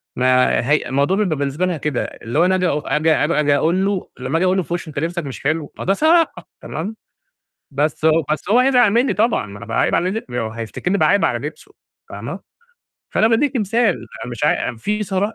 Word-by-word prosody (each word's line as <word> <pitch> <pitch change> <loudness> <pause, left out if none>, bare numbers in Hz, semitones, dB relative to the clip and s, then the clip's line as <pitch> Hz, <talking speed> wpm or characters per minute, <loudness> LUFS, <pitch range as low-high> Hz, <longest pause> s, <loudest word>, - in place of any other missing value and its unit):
ما 130 0 +3
هي 150 - +2
الموضوع 140 +8 +1
بيبقى 180 -8 0
بالنسبة 140 +5 -1
لها 175 -3 -1
كده 145 -3 -2
اللي 120 +7 -4
هو 175 - +5
أنا 185 0 +3
آجي 185 -1 +1
أق 150 -2 -2
آجي 155 +2 +3
آجي 150 -2 +2
أقول 175 +6 +1
له، 200 -2 -2
لمّا 130 +6 -1
آجي 185 - +1
أقول 185 +1 +2
له 185 - +1
في 170 - -5
وشه 165 -3 -5
لبسك 170 +3 -2
مش 135 -1 -7
حلو، 155 0 -1
ما - - -4
ده 195 - +3
صراحة، 325 - +2
تمام، 195 +8 -5 0.8
بس 150 +2 -1
هو 160 0 +4
بس 155 +5 -3
هو 240 +4 +5
هيزعل 250 -3 +4
مني 235 -1 +2
طبعًا، 220 - +1
ما 100 +1 -10
أنا 115 - -9
باعايب 115 - +1
علي 180 - +1
لب 210 - -5
هو 115 -3 -2
هيفتكرني 115 - -3
باعايب 200 0 +3
على 120 +4 -1
لبسه 155 - -12 0.4
فاهمة؟ - - -6 0.8
فأنا 220 - +4
بادِّيكِ 260 +4 +1
مثال، 220 -1 +2 0.3
أنا 125 - -6
مش 120 - -3
عاي 120 - 0
في 210 - -2
صراحة 200 +2 -1
170 Hz, 215 wpm, -19 LUFS, 140-200 Hz, 0.8 s, هو